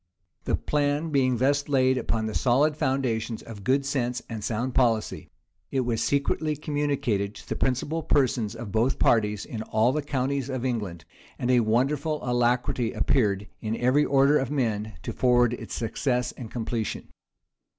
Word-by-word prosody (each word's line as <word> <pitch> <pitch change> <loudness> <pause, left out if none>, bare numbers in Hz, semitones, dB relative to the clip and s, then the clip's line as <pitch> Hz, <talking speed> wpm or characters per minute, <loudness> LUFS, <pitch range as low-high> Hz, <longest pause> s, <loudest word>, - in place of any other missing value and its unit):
The - - +2
plan 150 +2 0
being 130 -3 +2
thus 140 +4 +1
laid 130 -2 +3
upon 115 -3 -1
the 110 - -3
solid 140 +7 +2
foundations 130 -6 -1
of 105 -3 -10
good 135 +6 +2
sense 125 -3 -1
and 110 -3 -6
sound 120 +4 -2
policy, 115 -4 +1 0.4
it 135 - 0
was 115 -2 -1
secretly 145 +3 0
communicated 140 -9 -1
to - - -12
the - - -2
principal 145 +5 -1
persons 125 -8 +1
of 115 -3 -7
both 115 +5 +1
parties 105 -3 +2
in 110 - -6
all 110 +2 +2
the 150 +3 -1
counties 140 -1 -2
of 130 -1 -3
England; 105 -10 -3 0.3
and 125 - 0
a 125 - +5
wonderful 135 +7 +1
alacrity 120 -1 +1
appeared 105 -6 +1 0.2
in 110 +1 -2
every 130 +4 +3
order 140 +1 +4
of 130 - -2
men 110 -6 -1
to - - -4
forward 120 -1 +3
its - - -6
success 125 +2 -1
and 120 -3 -9
completion. 115 -1 -3
125 Hz, 160 wpm, -26 LUFS, 115-140 Hz, 0.4 s, a